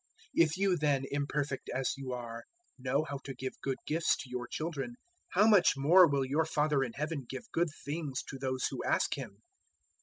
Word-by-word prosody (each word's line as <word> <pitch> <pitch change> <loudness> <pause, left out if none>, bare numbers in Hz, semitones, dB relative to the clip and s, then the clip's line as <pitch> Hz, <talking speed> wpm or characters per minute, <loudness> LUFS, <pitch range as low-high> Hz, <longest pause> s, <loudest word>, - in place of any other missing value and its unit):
007:011 165 - +7
If 155 +4 -4
you 190 -2 +2
then, 145 -3 +2
imperfect 145 -1 -2
as 130 +1 0
you 135 -2 -6
are, 115 -2 -5 0.4
know 135 +3 +1
how 140 -3 -5
to 135 - -6
give 130 0 -6
good 135 -1 -1
gifts 160 +2 +2
to 135 - -8
your 125 -1 -3
children, 160 - -4 0.4
how 200 +4 +5
much 205 -9 +5
more 170 +6 +7
will 140 -2 +1
your 150 +4 +1
Father 150 -3 +2
in 120 -3 -4
Heaven 150 -3 -3
give 130 -1 -7
good 170 0 +1 0.2
things 145 -2 -3
to 135 - -7
those 130 -1 -1
who - - -4
ask - - +1
Him! - - -8
140 Hz, 200 wpm, -32 LUFS, 130-160 Hz, 0.4 s, 007:011